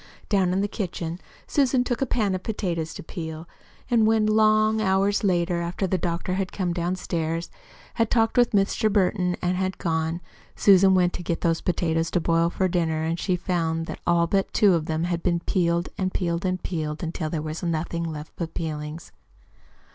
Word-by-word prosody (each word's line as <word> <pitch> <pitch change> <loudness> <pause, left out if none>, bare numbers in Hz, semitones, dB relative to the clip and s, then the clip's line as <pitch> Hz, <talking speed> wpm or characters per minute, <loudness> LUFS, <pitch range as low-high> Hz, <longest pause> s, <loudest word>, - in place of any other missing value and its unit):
Down 190 -4 +2
in 190 +2 +1
the 205 - +1
kitchen 175 -5 -4 0.3
Susan 265 -3 +2
took 245 0 -2
a 270 - +1
pan 210 -6 +1
of 185 - -2
potatoes 170 -7 -2
to - - -7
peel 160 0 -7 0.4
and 230 -3 +3
when, 220 -1 +3
long 215 0 +3
hours 195 +1 +2
later, 175 -2 +1
after 175 +3 -2
the 185 0 0
doctor 170 +2 -2
had 190 -1 -2
come 180 -3 -1
downstairs, 170 -2 -2 0.4
had 230 -1 +1
talked 225 -1 +2
with 245 -1 +5
Mr. 210 +2 +1
Burton, 185 -2 +1
and 180 +1 +1
had 185 0 -1
gone, 160 -1 -1 0.4
Susan 190 -1 +6
went 180 -1 +3
to - - -5
get 170 -1 -2
those 165 -1 +1
potatoes 165 -2 0
to 180 - +1
boil 165 0 +2
for 185 +2 0
dinner, 160 -2 0
she 180 +1 0
found 165 -2 -1
that - - -7
all 170 -1 +4
but 195 +3 0
two 205 -3 +5
of 160 -2 0
them 160 0 -1
had 170 -1 -1
been 170 -1 +1
peeled 170 -1 0
and 185 -1 0
peeled 170 0 -1
and 185 0 -1
peeled, 155 -3 -3
until 160 -1 -3
there 160 - -2
was 155 +1 -5
nothing 170 0 -2
left 155 -2 -6
but 165 -2 -5
peelings. 155 0 -5
175 Hz, 190 wpm, -25 LUFS, 165-195 Hz, 0.4 s, Susan